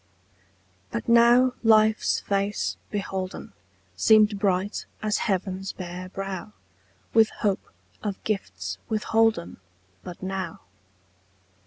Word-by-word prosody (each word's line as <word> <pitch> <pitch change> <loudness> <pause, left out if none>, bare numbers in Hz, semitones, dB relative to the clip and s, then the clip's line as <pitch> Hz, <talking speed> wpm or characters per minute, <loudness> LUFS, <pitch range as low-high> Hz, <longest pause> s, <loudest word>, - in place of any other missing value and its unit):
BUT 230 - -4
now 240 +2 +6
life's 220 -1 +4
face 200 +1 -1
beholden 190 -2 -4 0.4
Seemed 210 - +5
bright 195 +1 0 0.2
as 215 -1 +1
heaven's 190 0 -2
bare 180 0 -7
brow 195 +2 -6 0.6
With 225 -1 +6
hope 200 -2 -2 0.3
of 205 -2 -2
gifts 210 -3 -3
withholden 220 -4 +1 0.5
But 180 0 -9
now. 190 -3 -4
200 Hz, 95 wpm, -25 LUFS, 190-220 Hz, 0.6 s, now